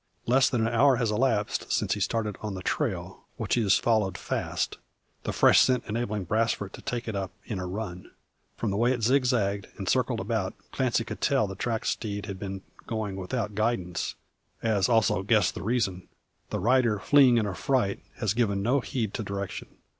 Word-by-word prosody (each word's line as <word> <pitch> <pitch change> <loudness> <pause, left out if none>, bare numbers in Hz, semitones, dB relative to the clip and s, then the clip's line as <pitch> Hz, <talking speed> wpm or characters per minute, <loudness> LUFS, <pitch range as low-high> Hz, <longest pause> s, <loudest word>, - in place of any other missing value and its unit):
Less 130 +2 +4
than 115 -3 +1
an 115 - -1
hour 135 +3 +5
has 115 -3 0
elapsed 105 -2 0
since - - +1
his 100 -2 +1
starting 105 -1 -2
on 105 -2 -4
the 95 - -6
trail, - - -2
which - - -2
he 120 - +3
has 100 -3 +4
followed 110 -5 +1
fast; - - -2 0.5
the - - -1
fresh - - +6
scent 130 -1 +3
enabling 105 -2 -2
Brasfort 105 0 0
to - - -9
take 125 -3 -4
it 110 - -3
up 95 -1 -2 0.2
in 105 -5 -4
a 90 - -4
run. 90 -2 -5 0.5
From 110 - -1
the 100 - -1
way 120 +3 +3
it 120 -3 -4
zigzagged, 115 -6 +2
and - - -5
circled - - +1
about, - - -2 0.2
Clancy - - +1
could - - -7
tell 110 - +3
the 95 - -5
tracked 110 +3 -2
steed 100 -2 -2
had 95 -2 -6
been 95 -1 -5 0.2
going 110 -4 -3
without 105 +3 -3
guidance, 100 -5 -1 0.5
as 105 -4 +2
also 110 -5 +3
guess 105 -2 +3
the - - -7
reason. 100 -3 -1 0.4
The - - -2
rider, 120 +1 +3
fleeing 130 +2 +5
in 110 - +2
affright, 100 +2 0
has 105 -3 0
given 100 -4 +1
no 130 +6 +3
heed 110 -1 -3
to 115 - -3
direction. 100 -1 -5
110 Hz, 190 wpm, -27 LUFS, 100-120 Hz, 0.5 s, fresh